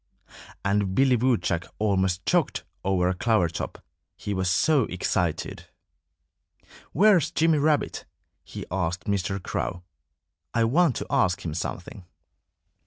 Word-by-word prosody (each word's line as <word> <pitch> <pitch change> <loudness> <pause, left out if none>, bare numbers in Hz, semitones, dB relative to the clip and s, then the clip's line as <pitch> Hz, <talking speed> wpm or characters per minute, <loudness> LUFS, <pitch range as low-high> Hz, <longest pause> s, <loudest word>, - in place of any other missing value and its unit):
And 100 -1 +1
Billy 135 +1 +4
Woodchuck 115 -8 0
almost 95 -3 0
choked - - +1 0.2
over 95 -2 +1
a 90 - +1
clover 110 -1 +2
top, 85 - -6 0.3
he 105 - -4
was 95 -1 0
so 135 - +3
excited. 90 - -2 1.3
"Where's 180 -3 +4
Jimmy 165 -2 +2
Rabbit?" 150 0 0 0.4
he - - -8
asked 90 -1 -2
Mr. 100 -2 -1
Crow. 90 -1 -3 0.7
"I 115 - +3
want 140 +4 +3
to - - -4
ask 95 0 +1
him 80 - -3
something." 90 +3 -6
100 Hz, 120 wpm, -25 LUFS, 90-130 Hz, 1.3 s, Billy